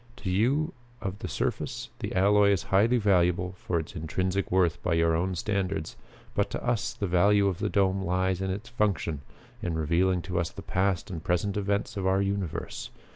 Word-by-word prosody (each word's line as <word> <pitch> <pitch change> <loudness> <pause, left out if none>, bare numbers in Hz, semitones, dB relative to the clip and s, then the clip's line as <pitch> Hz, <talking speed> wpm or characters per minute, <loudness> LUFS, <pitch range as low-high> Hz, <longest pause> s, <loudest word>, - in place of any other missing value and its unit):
To 95 -7 -4
you 135 - +2 0.3
of 95 0 -4
the - - -4
surface - - -3
the - - -4
alloy 100 +2 +5
is 100 -3 +2
highly 110 +6 +5
valuable 90 -3 +2
for 90 -2 -2
its 80 +4 -7
intrinsic 90 +4 -1
worth 90 -2 +2
by 85 - +1
your 85 0 +3
own 90 +3 0
standards, 100 0 -2 0.4
but 100 0 +1
to - - -5
us 120 -4 +1
the 100 - -3
value 100 +3 +4
of 95 -2 -1
the 105 - 0
dome 95 -2 +2
lies 95 0 0
in 95 - -1
its 100 +5 -4
function 100 - 0 0.4
in 85 -2 -2
revealing 85 +3 +1
to 90 -1 -2
us 85 - -1
the - - -10
past 95 -1 0
and 80 -3 -5
present 90 +3 0
events 100 +1 -1
of 95 -1 0
our 95 +1 +3
universe. 100 -4 -3
95 Hz, 190 wpm, -28 LUFS, 90-100 Hz, 0.4 s, alloy